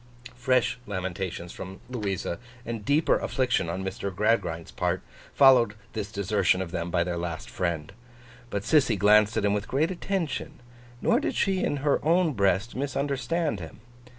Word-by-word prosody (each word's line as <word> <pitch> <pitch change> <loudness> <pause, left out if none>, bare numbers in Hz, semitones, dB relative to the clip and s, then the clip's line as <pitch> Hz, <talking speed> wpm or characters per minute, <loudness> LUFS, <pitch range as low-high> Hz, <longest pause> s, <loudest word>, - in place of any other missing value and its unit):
Fresh 125 0 +1
lamentations 95 -2 -4
from 95 +1 -8
Louisa, 100 -8 -3 0.3
and 115 -2 -4
deeper 145 +6 +3
affliction 125 -10 0
on 95 +3 -3
Mr. 95 +1 -3
Gradgrind's 95 -5 0
part, - - -1 0.3
followed 125 -6 +6 0.2
this 105 -2 -4
desertion 100 -3 +1
of 95 -3 -4
them 85 -1 -3
by 85 0 +2
their 85 -1 -3
last 85 -2 -5
friend. 85 -2 -2 0.6
But, 100 -3 -3
Sissy 135 -5 +3
glanced 105 +2 +5
at - - +1
him 100 - +3
with 105 0 -2
great 155 +7 +1
attention; 180 -9 -3 0.4
nor 235 - +4
did - - -2
she 190 -2 +1
in 145 - 0
her 145 - +2
own 165 +1 +3
breast 100 +1 +1
misunderstand 140 - -1
him. 80 +3 -9
105 Hz, 155 wpm, -27 LUFS, 95-135 Hz, 0.6 s, followed